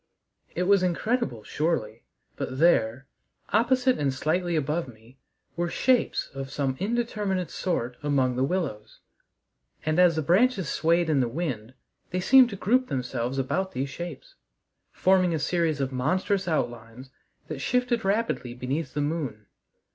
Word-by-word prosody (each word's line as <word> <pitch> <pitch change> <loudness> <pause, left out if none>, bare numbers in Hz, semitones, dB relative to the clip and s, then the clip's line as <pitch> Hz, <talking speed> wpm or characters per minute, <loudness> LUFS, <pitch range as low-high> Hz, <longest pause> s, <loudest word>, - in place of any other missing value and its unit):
It 180 - 0
was 200 +1 +4
incredible, 185 - -1
surely, 115 -7 -2 0.3
but 130 - -4
there, 130 -5 +3 0.4
opposite 255 +4 +2
and 140 -2 +1
slightly 170 +6 -1
above 155 +2 -1
me, 120 +2 -16 0.4
were 175 0 -1
shapes 250 +6 +1
of 135 0 -6
some 135 -2 -1
indeterminate 205 -4 -1
sort 125 -10 -2
among 135 -4 +1
the 130 - +1
willows, 140 - -3 0.8
and 155 +2 +1
as 175 -3 +5
the 160 - -1
branches 190 - +3
swayed 170 +1 +2
in 155 -3 +2
the 125 - +2
wind 130 -4 -4 0.3
they 180 - -2
seemed 255 +6 +6
to 200 - -6
group 250 +7 +2
themselves 125 0 -3
about 185 +9 -1
these 135 +2 -3
shapes, 175 - -8 0.6
forming 185 -2 +3
a - - 0
series 160 -1 0
of 135 -1 -1
monstrous 185 +9 0
outlines 120 -4 -3 0.4
that 155 -3 -5
shifted 250 - 0
rapidly 195 - -1
beneath 135 +4 -3
the 145 - 0
moon. 145 -8 -3
160 Hz, 145 wpm, -26 LUFS, 130-190 Hz, 0.8 s, seemed